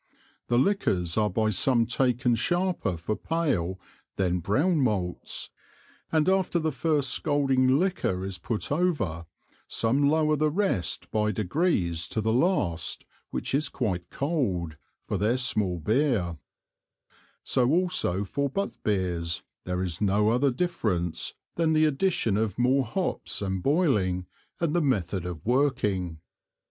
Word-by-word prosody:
The 120 - +2
Liquors 95 - +1
are 105 -1 +2
by 110 +3 +1
some 120 +3 +3
taken 125 0 +1
sharper 175 - 0
for 85 +6 -2
pale 120 - -1 0.4
than 90 -2 0
brown 150 - +1
Malts, 100 -8 -1 0.6
and 160 0 +2
after 190 -2 +2
the 160 -2 0
first 140 0 +1
scalding 135 -3 +2
Liquor 165 - 0
is 95 -2 -4
put 110 +7 -3
over, 140 - 0 0.4
some 135 +5 +2
lower 155 0 +3
the 155 +1 +2
rest 155 - -1
by 105 0 +1
degrees 95 - 0
to - - -2
the 110 +1 +1
last 115 - +1 0.2
which - - -3
is 145 +3 +1
quite 90 -8 -3
Cold, 105 - -1 0.3
for - - -2
their 110 +5 +2
small 105 -8 +1
Beer; 105 - +1 1.1
so 125 -1 +2
also 170 - +1
for 140 +8 -2
Butt 200 +9 -3
Beers 90 -5 -1 0.2
there 90 0 -1
is 90 -1 -2
no 105 +1 +3
other 130 +4 +3
difference 105 - -1 0.2
than 165 -1 +2
the 155 0 +4
addition 150 - +1
of 110 -2 -1
more 130 +2 +3
Hops, 185 - -3
and 95 -2 -2
boiling, 105 - +1 0.3
and 165 -1 0
the 175 - +3
method 95 - 0
of 85 -3 -7
working. 110 - +1
120 Hz, 135 wpm, -27 LUFS, 95-150 Hz, 1.1 s, the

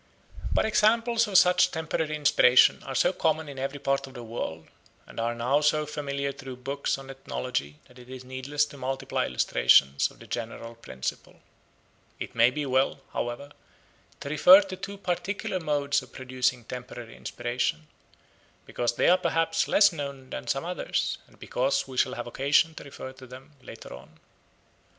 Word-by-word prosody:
But - - +2
examples 230 +2 +3
of 195 -3 +3
such 180 0 +5
temporary 160 -2 -2
inspiration 130 -4 +5
are 135 - -7
so 135 - +3
common 160 -2 0
in 140 -2 -8
every 135 +2 -3
part 135 0 -1
of 135 - -14
the 120 - -7
world 85 -8 -5 0.4
and - - -10
are 115 +1 -1
now 125 +5 +1
so 150 0 +2
familiar 140 -2 -3
through 135 -2 -9
books 135 +3 -2
on 135 0 -9
ethnology 130 - -4
that 125 -1 -17
it 125 0 -15
is 130 -1 -8
needless 130 +3 -1
to 145 - -13
multiply 130 +1 -2
illustrations 70 +3 +3
of - - -19
the - - -14
general 115 0 -6
principle. 65 - -7 0.8
It - - -6
may 115 +1 +5
be 150 +3 -3
well, 130 0 +1
however, 120 +4 -4 0.7
to 140 - -5
refer 180 +6 +8
to 195 -2 -6
two 200 +2 -7
particular 190 0 -3
modes 145 -3 0
of 130 - -15
producing 130 -1 -1
temporary 120 -1 -8
inspiration, 120 -10 -3 0.8
because 120 0 -2
they - - +2
are 180 +1 +5
perhaps 165 -2 +1
less 200 -2 +5
known 140 -4 -7
than - - -6
some 135 +4 -1
others, 180 +1 -2
and - - -22
because 130 +2 -1
we 130 - -9
shall - - +2
have - - -5
occasion 145 +6 +2
to - - -10
refer 135 -2 -9
to 130 -1 -13
them 130 +4 -12
later - - -11
on. 70 +6 -14
135 Hz, 170 wpm, -27 LUFS, 125-155 Hz, 0.8 s, refer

